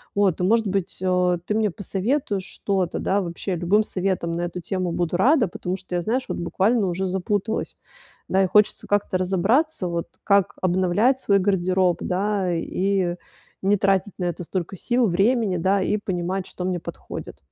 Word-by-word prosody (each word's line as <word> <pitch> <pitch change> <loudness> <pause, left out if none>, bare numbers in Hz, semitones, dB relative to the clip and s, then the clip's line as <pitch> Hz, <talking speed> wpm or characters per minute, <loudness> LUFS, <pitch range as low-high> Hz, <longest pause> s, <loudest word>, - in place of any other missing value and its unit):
Вот, 200 -4 +2
и, - - +1
может 220 +2 +3
быть, 195 -1 -2
э, 180 -1 +2
ты 210 - -1
мне 215 -3 +1
посоветуешь 200 - -2
что-то, 190 -3 -2
да, 200 +1 +1
вообще, 180 +2 -3
любым 180 +5 +3
советом 185 -4 -2
на 170 - -2
эту 175 +1 -4
тему 185 -1 -2
буду 175 0 -1
рада, 250 - +4
потому 180 +1 -4
что 180 -1 -6
я, 175 - +1
знаешь, 250 +7 -1
вот - - -2
буквально 195 +6 +1
уже 180 +2 -1
запуталась. 200 +4 -2 0.5
Да, 190 +1 +3
и - - +2
хочется 210 +3 +3
как-то 205 -2 +1
разобраться, 195 - +1
вот, 170 -1 -3 0.2
как 200 -2 +3
обновлять 185 +8 +2
свой 200 -5 +3
гардероб, 185 -2 +2
да, 190 -1 0
и 185 +1 0 0.5
не 200 +1 +3
тратить 195 0 +1
на 180 - -1
это 175 0 -3
столько 185 +2 -4
сил, 240 +4 +1
времени, 200 +1 +2
да, 190 +3 +2
и 210 - +1
понимать, 185 -1 -2
что 180 - -7
мне 180 -1 -1
подходит. - - -8
190 Hz, 175 wpm, -23 LUFS, 180-205 Hz, 0.5 s, рада